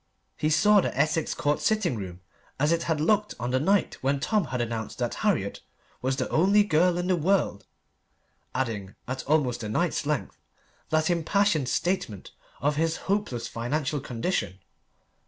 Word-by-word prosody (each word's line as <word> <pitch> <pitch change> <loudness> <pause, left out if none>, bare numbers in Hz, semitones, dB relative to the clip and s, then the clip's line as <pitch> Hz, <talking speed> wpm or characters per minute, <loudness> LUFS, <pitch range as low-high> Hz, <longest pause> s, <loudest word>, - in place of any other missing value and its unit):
He 155 - 0
saw 205 +6 +5
the - - -3
Essex 155 +1 +1
Court 145 0 0
sitting 215 - +1
room 95 -4 -7 0.4
as 150 +3 +3
it 170 0 +2
had 160 -2 +1
looked 210 +6 +1
on 120 +1 -2
the 130 - +2
night 195 +7 +1
when 140 +1 +1
Tom 210 +5 +1
had 125 -1 -3
announced 115 -2 -3
that 120 -2 -1
Harriet 175 - 0 0.4
was 130 +1 0
the - - -2
only 200 +6 +4
girl 175 -1 +3
in 175 - -1
the 185 0 +2
world 175 - 0 0.9
adding, 110 -7 -3
at 130 +1 -4
almost 140 -6 +1
a 105 - -4
night's 155 +4 0
length, 150 -1 -2 0.5
that 155 +2 +2
impassioned 170 -4 +1
statement 175 - -2 0.3
of 145 +1 +1
his 160 +1 +1
hopeless, 195 - -1
financial 140 +5 -2
condition. 120 - -2
150 Hz, 160 wpm, -27 LUFS, 125-180 Hz, 0.9 s, saw